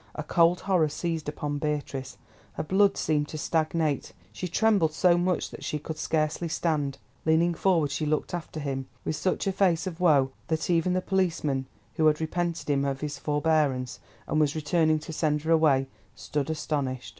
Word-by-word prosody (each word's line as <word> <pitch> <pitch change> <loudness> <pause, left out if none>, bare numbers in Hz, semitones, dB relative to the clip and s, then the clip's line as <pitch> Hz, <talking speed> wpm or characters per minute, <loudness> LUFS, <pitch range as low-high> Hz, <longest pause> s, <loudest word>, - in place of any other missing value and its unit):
A 155 - -4
cold 170 +3 +3
horror 180 -6 +2
seized 165 -1 -3
upon 145 -1 -3
Beatrice, 145 -3 -3 0.4
her - - -3
blood 195 +4 +3
seemed 150 -1 0
to 155 - -6
stagnate. 155 -2 0 0.2
She 180 - -4
trembled 190 -3 +2
so 175 +2 +4
much 175 0 0
that - - -9
she 150 - -2
could 155 +1 -6
scarcely 155 +2 0
stand. 150 -5 -1 0.3
Leaning 165 +2 +3
forward, 165 -4 +2
she 150 +2 -2
looked 155 +2 -1
after 170 -2 -5
him, 135 -2 -3 0.2
with 155 - -1
such 185 - -1
a 195 - +1
face 185 -3 +2
of 180 -2 -5
woe 145 -7 +4 0.2
that 160 +2 -1
even 170 +1 +2
the 185 - +1
policeman, 165 -9 0 0.3
who 160 -2 +4
had 150 -1 +3
repented 170 +1 -2
him 140 -1 +1
of 135 -1 -2
his 145 -2 -4
forbearance, 145 -4 0 0.3
and 155 - 0
was 150 -1 +2
returning 155 +1 +2
to 155 +1 -7
send 150 -1 0
her 160 - -1
away, 150 -5 +4 0.3
stood 145 -1 -3
astonished. 145 -5 -2
155 Hz, 180 wpm, -27 LUFS, 145-170 Hz, 0.4 s, so